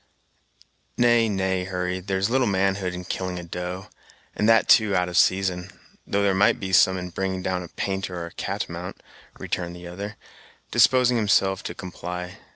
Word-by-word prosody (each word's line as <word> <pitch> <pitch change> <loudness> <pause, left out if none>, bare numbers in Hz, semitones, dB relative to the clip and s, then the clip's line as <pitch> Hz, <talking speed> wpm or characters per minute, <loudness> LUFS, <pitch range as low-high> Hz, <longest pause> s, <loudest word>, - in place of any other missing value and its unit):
"Nay, 120 -2 +4
nay, 95 -2 -1
Hurry, 90 0 -2
there's 95 +1 -1
little 125 +1 +2
manhood 95 -2 0
in 90 0 -7
killing 90 0 -3
a 90 - -6
doe, 90 +2 -5 0.5
and 105 - +2
that 115 -1 +5
too 110 -3 +5
out 90 -1 +1
of 90 - -6
season; 95 -1 +2 0.4
though 100 0 +1
there 100 -1 +3
might 100 +2 +3
be 95 -1 -4
some 95 0 +5
in 90 0 -6
bringing 95 +1 -3
down 95 -1 -1
a 90 - -7
painter 95 0 -3
or 85 - -4
a 85 - -9
catamount," - - -5 0.3
returned 85 -1 -4
the 90 0 -10
other, 100 +4 -7 0.5
disposing 125 +2 +4
himself 95 -3 +2
to - - -6
comply. 90 0 -7
95 Hz, 170 wpm, -24 LUFS, 90-100 Hz, 0.5 s, that